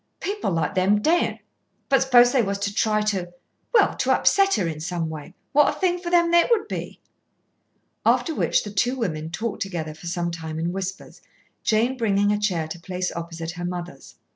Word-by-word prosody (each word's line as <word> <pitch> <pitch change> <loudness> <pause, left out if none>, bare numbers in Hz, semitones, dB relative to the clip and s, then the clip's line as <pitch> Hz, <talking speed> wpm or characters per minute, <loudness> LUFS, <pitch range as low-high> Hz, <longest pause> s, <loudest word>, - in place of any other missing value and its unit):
"People 410 - -2
like 165 -4 -1
them 190 +3 +3
daren't. 330 +10 +1 0.5
But 270 -2 +3
suppose 245 -2 +6
they 260 - +3
was 200 -2 -1
to 200 0 -3
try 215 0 +1
to, 190 -4 -2 0.4
well, 480 - +4
to - - +1
upset 395 0 +4
her 190 - 0
in 155 -2 -4
some 165 0 -3
way, 155 +4 -9 0.2
what 295 0 +5
a - - -5
thing 360 -2 +1
for 350 -1 -5
them 340 -1 +3
it 345 +5 +5
would 455 -3 +2
be." - - -6 1.0
After 325 - +2
which - - +1
the 205 - -7
two 245 +6 +1
women 160 -10 -3
talked 220 +6 -4
together 165 -5 -3
for 160 +3 -11
some 170 0 -2
time 160 -2 -6
in 170 +2 -2
whispers, 190 0 -6 0.4
Jane 235 +4 +1
bringing 205 -3 +2
a 210 - 0
chair 180 -7 -1
to 170 - -7
place 180 +1 -3
opposite 165 -1 -5
her 175 0 -7
mother's. 175 -5 -7
195 Hz, 195 wpm, -24 LUFS, 170-245 Hz, 1.0 s, suppose